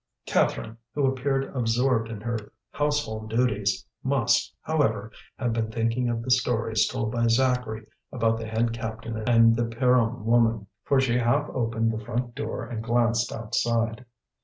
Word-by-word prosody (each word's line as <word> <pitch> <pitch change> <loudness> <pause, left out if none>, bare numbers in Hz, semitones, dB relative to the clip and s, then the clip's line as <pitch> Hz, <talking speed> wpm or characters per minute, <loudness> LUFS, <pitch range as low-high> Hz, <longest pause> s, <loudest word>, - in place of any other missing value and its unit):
Catherine, 115 +1 0 0.2
who 145 -2 +2
appeared 135 +1 -1
absorbed 120 -1 +1
in 110 -3 -6
her 115 -2 -4 0.2
household 145 -8 -1
duties, 110 -4 0 0.2
must, - - +2
however, 115 -9 0 0.3
have 120 -3 -1
been 110 -1 -1
thinking 115 +2 0
of 115 -1 -2
the 130 - -2
stories 115 -3 +2
told 110 -1 -2
by 115 0 +1
Zacharie 120 -2 +1 0.3
about 115 -2 +1
the 115 - -5
head 115 +1 0
captain 115 0 -5
and 115 -1 +6
the 120 +1 0
Pierron 120 -1 +1
woman, 115 -2 +3 0.2
for 140 - +3
she 125 -2 +2
half 140 +5 +2
opened 115 -2 0
the 110 0 -5
front 120 +1 -3
door 115 +2 -4
and 115 -2 -5
glanced 120 0 +1
outside. 115 +1 -1
115 Hz, 155 wpm, -26 LUFS, 115-125 Hz, 0.3 s, and